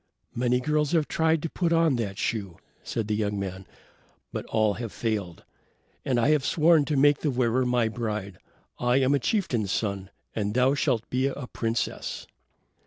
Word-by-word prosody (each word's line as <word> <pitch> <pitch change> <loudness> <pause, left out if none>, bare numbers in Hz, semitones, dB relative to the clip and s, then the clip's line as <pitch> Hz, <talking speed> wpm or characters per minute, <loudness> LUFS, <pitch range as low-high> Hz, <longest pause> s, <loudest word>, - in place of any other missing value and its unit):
"Many 125 +1 +1
girls 150 +3 0
have 160 -3 +2
tried 160 -1 +1
to 165 - -2
put 170 -2 0
on 165 -4 +3
that 100 -4 -3
shoe," 100 -8 -2 0.2
said 110 -2 -3
the 105 - 0
young 105 -1 -1
man, 95 -1 -5 0.7
"but - - -4
all 110 -2 +2
have 115 0 -5
failed. 105 -7 -3 0.6
And 125 -2 +1
I 120 - +3
have 150 -3 +3
sworn 160 0 +4
to 150 -1 -1
make 145 +1 +5
the 150 - 0
wearer 125 -1 +1
my 125 -2 +2
bride. 105 -4 -4 0.4
I 125 0 +2
am 135 +1 +3
a 140 - +3
chieftain's 120 - 0
son, 100 -3 -2 0.3
and 105 0 -2
thou 130 +2 +4
shalt 130 -6 0
be 130 +2 +1
a 140 -1 -4
princess." 115 -1 -3
125 Hz, 175 wpm, -26 LUFS, 110-145 Hz, 0.7 s, make